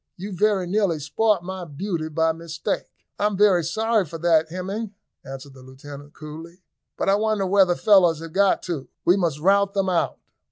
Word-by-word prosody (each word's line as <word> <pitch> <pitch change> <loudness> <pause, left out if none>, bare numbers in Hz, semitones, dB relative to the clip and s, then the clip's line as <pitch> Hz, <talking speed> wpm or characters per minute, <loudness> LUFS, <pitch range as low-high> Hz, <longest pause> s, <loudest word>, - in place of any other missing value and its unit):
"You 195 +2 -6
very 205 -1 +1
nearly 190 -2 0
spoilt 210 +5 +1
my 190 0 -6
beauty 165 +1 -4
by 160 +1 +1
mistake." 165 0 -4 0.3
"I 205 - +3
am 205 -2 -3
very 195 -4 +4
sorry 220 +6 +1
for 165 -1 -8
that, 160 -1 +2
Hemming," 195 +4 -5 0.3
answered 135 +1 -9
the 130 - -15
lieutenant 140 +2 -12
coolly; 165 +4 -11 0.3
"but - - -2
I 195 - +4
wonder 215 -1 +1
where 195 +1 +4
the 175 -1 0
fellows 180 -6 +4
have 165 -1 -9
got 200 +1 +2
to. 150 -8 -4 0.2
We 175 - +5
must 170 -7 0
rout 200 +4 +2
them 195 -1 +1
out." 175 -2 0
175 Hz, 190 wpm, -23 LUFS, 160-200 Hz, 0.3 s, We